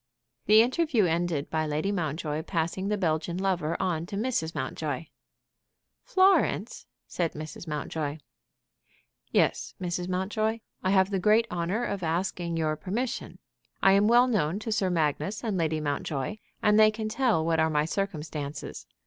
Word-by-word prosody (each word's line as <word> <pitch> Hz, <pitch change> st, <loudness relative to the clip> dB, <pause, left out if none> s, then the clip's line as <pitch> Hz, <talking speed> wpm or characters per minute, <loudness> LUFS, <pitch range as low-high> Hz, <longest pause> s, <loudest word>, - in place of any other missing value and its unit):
The 215 Hz, +1 st, +8 dB
interview 255 Hz, -, +2 dB
ended 165 Hz, -3 st, -1 dB
by 155 Hz, -1 st, 0 dB
Lady 155 Hz, +6 st, -1 dB
Mountjoy 155 Hz, -4 st, -2 dB
passing 170 Hz, +3 st, -2 dB
the 210 Hz, 0 st, 0 dB
Belgian 170 Hz, -1 st, -1 dB
lover 185 Hz, -4 st, 0 dB
on 170 Hz, -3 st, -1 dB
to 200 Hz, -, -6 dB
Mrs. 200 Hz, -8 st, -1 dB
Mountjoy. 145 Hz, +2 st, -3 dB, 1.0 s
"Florence!" 380 Hz, +1 st, +2 dB, 0.2 s
said 170 Hz, -3 st, -2 dB
Mrs. 155 Hz, +2 st, -8 dB
Mountjoy. 150 Hz, 0 st, -3 dB, 1.1 s
"Yes, -, -, +1 dB
Mrs. 175 Hz, -1 st, -2 dB
Mountjoy; 215 Hz, +5 st, -1 dB, 0.2 s
I 185 Hz, -, 0 dB
have 190 Hz, 0 st, +3 dB
the 195 Hz, -, 0 dB
great 215 Hz, +4 st, +4 dB
honor 180 Hz, +6 st, -1 dB
of 200 Hz, -2 st, -3 dB
asking 170 Hz, 0 st, -1 dB
your 155 Hz, -1 st, 0 dB
permission. 235 Hz, +10 st, -3 dB, 0.5 s
I 195 Hz, -, +7 dB
am 200 Hz, +2 st, +4 dB
well 240 Hz, +2 st, +6 dB
known 195 Hz, -8 st, +1 dB
to 225 Hz, -, -4 dB
Sir 195 Hz, -3 st, +1 dB
Magnus 175 Hz, -, -1 dB
and 220 Hz, -4 st, -1 dB
Lady 160 Hz, -3 st, 0 dB
Mountjoy, 145 Hz, +4 st, -2 dB, 0.3 s
and 210 Hz, 0 st, +5 dB
they 215 Hz, 0 st, +8 dB
can 215 Hz, 0 st, -4 dB
tell 215 Hz, -8 st, +1 dB
what 165 Hz, -1 st, +2 dB
are 160 Hz, 0 st, +3 dB
my 150 Hz, -1 st, +1 dB
circumstances. 155 Hz, -, -4 dB
175 Hz, 150 wpm, -28 LUFS, 160-210 Hz, 1.1 s, The